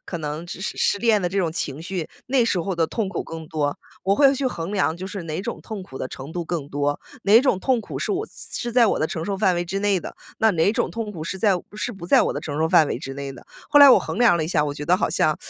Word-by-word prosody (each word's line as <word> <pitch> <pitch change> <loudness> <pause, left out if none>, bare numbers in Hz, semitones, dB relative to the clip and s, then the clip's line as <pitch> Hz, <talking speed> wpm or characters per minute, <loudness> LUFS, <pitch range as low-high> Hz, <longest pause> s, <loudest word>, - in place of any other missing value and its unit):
可 175 - -4
能 155 +2 -5
失 185 - -7
失 - - -3
失 - - +2
恋 220 -1 +3
的 175 - 0
这 195 - -5
种 170 -4 0
情 150 -2 -4
绪， 180 -3 -4 0.2
那 260 -1 +3
时 230 -5 +1
候 185 +2 -2
的 165 -2 +1
痛 220 +2 -2
苦 190 - -3
更 160 -1 -8
多， 145 -2 -1 0.3
我 195 +1 +2
会 275 -1 +5
去 270 0 -1
衡 175 -5 -4
量。 185 -5 +1
就 185 - -6
是 190 -2 -6
哪 155 -1 -4
种 235 - -5
痛 215 -4 -7
苦 130 -7 -10
的 130 - -4
程 135 +4 -8
度 175 0 -3
更 165 -4 -4
多， 145 0 -1 0.3
哪 205 +3 +7
种 230 -9 +2
痛 260 -3 +2
苦 - - -6
是 - - -2
我 400 +2 -1
是 - - -17 0.3
是 240 -1 -4
在 240 -1 +5
我 - - +1
的 155 - +1
承 160 - -4
受 200 - -2
范 190 -2 +2
围 175 - 0
之 175 +3 -3
内 200 -2 +2
的， - - -9 0.2
那 220 - +4
哪 170 +4 +2
种 - - -1
痛 225 -2 -4
苦 165 -5 -7
是 180 +4 -4
在 205 0 +3 0.2
是 240 +3 -3
不 185 -4 -9
在 - - +5
我 - - 0
的 - - -4
承 145 -1 -5
受 160 - +2
范 165 -2 +5
围 - - -3
之 135 - -6
内 140 0 -5
的。 130 - -12 0.2
后 290 - +5
来 285 -2 +10
我 - - +8
衡 - - -5
量 235 -8 +5
了 160 - 0
一 155 - -3
下， 155 -4 +2
我 145 - -2
觉 145 +1 -7
得 180 - +4
好 190 - 0
像 - - +2
180 Hz, 330 characters per minute, -23 LUFS, 160-215 Hz, 0.3 s, 来